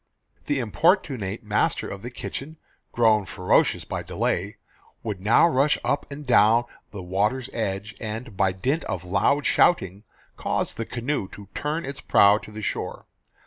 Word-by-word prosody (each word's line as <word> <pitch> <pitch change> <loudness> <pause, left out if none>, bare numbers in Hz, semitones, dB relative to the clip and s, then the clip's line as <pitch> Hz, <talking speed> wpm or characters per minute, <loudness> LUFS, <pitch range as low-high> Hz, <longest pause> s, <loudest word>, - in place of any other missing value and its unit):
The 145 - +1
importunate 125 - +1
master 105 0 0
of 100 - -7
the 120 - -6
kitchen, 140 +5 -7 0.3
grown 110 -3 +3
ferocious 90 -2 +2
by - - -4
delay, 100 +5 -2 0.5
would 105 -5 -4
now 110 - +5
rush 145 -1 +2
up 145 - -1
and 145 +1 -7
down 115 -1 +5 0.2
the 100 -3 -8
water's 105 +8 -1
edge, 105 -1 -3
and, 110 0 -6
by 95 0 +2
dint 130 - -1
of 90 - -3
loud 140 +10 +1
shouting, 100 - +2 0.3
cause - - -1
the 115 - -4
canoe 125 -3 -2
to 100 -2 -11
turn 150 +2 -2
its 140 0 -7
prow 100 +1 +5
to 115 - -12
the 105 0 -8
shore. - - -4
110 Hz, 155 wpm, -25 LUFS, 100-135 Hz, 0.5 s, now